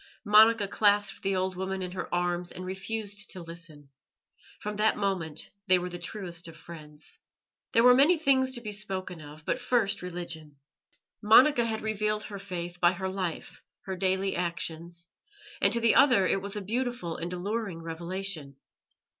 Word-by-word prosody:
Monica 215 0 +6
clasped 205 0 +2
the 195 0 0
old 185 0 -1
woman 190 +1 -3
in 180 - -5
her 185 - -6
arms 175 0 -1
and 185 - -7
refused 205 +2 -4
to 185 - -6
listen. 165 -4 -11 0.7
From 210 0 -5
that 215 +1 +3
moment 185 -7 -2 0.2
they 185 0 +6
were 180 0 -3
the 175 0 -7
truest 175 -2 -3
of 165 -1 -11
friends. 155 -2 -12 0.5
There 230 - +5
were 250 0 +8
many 290 +7 +6
things 265 -4 +2
to 240 - -6
be 215 -2 -5
spoken 190 -4 -4
of, 150 +1 -12
but 255 - -1
first 245 -4 +1
religion. 170 -4 -6 0.7
Monica 240 +4 +6
had 220 -1 -2
revealed 215 0 -1
her 200 -1 -7
Faith 175 -3 -6
by 175 0 +4
her 190 +1 -3
life, 185 -3 -5 0.2
her 190 - -4
daily 190 +1 0
actions, 170 -1 -4 0.6
and - - +5
to 235 - +2
the 230 -1 +4
other 245 -9 +5
it 195 - +1
was 200 +1 -4
a 210 - -3
beautiful 240 -5 -2
and 170 +1 -5
alluring 190 -1 -3
revelation. 165 -3 -4
190 Hz, 170 wpm, -28 LUFS, 175-215 Hz, 0.7 s, were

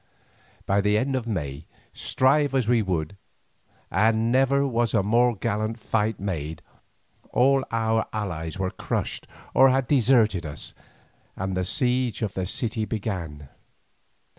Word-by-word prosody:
By 100 +1 +2
the 105 +1 +2
month 130 +4 0
of 125 -3 -3
May, 75 -8 -4 0.3
strive 135 +1 +2
as 130 -5 +1
we 120 -1 +3
would, 90 -2 -2 0.7
and 110 +4 +2
never 135 +2 +3
was 120 -4 0
a 100 - +3
more 120 +3 +3
gallant 110 +3 -2
fight 110 -1 -1
made, 80 -4 -4 0.7
all 135 +2 +3
our 110 -1 0
allies 90 -5 -4
were 95 -1 -2
crushed - - -3 0.3
or 135 - +6
had 130 -1 +1
deserted 115 - +3
us, 75 -3 -7 0.6
and 95 0 -3
the 90 - 0
siege 125 +4 0
of 105 -2 -2
the 95 -1 -3
city 110 +2 -1
began. 90 -10 -4
110 Hz, 140 wpm, -25 LUFS, 95-125 Hz, 0.7 s, or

